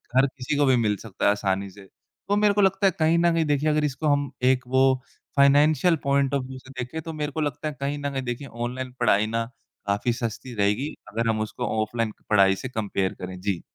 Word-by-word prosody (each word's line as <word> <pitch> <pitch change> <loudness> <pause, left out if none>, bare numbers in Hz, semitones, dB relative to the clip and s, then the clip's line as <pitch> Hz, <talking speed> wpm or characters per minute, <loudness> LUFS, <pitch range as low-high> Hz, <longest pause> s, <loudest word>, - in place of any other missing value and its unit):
हर 130 +1 +6
किसी 135 +1 -4
को 145 - +4
भी 130 -1 +4
मिल 105 -3 +1
सकता 110 -4 -4
है - - +6
आसानी 100 -1 -1
से। 100 +2 -14 0.5
तो 205 - +3
मेरे 205 0 +4
को 205 - +2
लगता 195 0 +2
है - - +3
कहीं 160 +1 +3
न 170 0 +3
कहीं 165 -1 +1
देखिए 145 +1 +1
अगर 150 0 +1
इसको 150 +2 -2
हम 145 -2 +1
एक 130 0 +3
वो 130 +1 +4 0.5
फाइनेंशियल 150 +5 +5
पॉइंट 140 0 +2
ऑफ 140 -2 +1
व्यू 130 0 -8
से 130 +1 -15
देखें 125 +6 -4
तो 160 +1 -7
मेरे 150 -1 -3
को 155 - -3
लगता 150 +1 -2
है 150 - -3
कहीं 140 +1 -2
न 140 0 -2
कहीं 135 -1 -3
देखिए 120 +3 -4
ऑनलाइन 125 +2 -5
पढ़ाई 110 -3 +3
ना 115 +1 -1 0.4
काफ़ी 100 +4 +1
सस्ती 120 +1 -5
रहेगी 105 +8 0 0.2
अगर 115 +1 0
हम 110 -1 0
उसको 110 +3 -4 0.2
ऑफ़लाइन 110 0 -2 0.2
पढ़ाई 95 -2 +5
से 130 - -6
कंपेयर 100 -5 -2
करें। 90 0 -6
जी। 95 -3 -1
130 Hz, 230 wpm, -25 LUFS, 110-145 Hz, 0.5 s, हर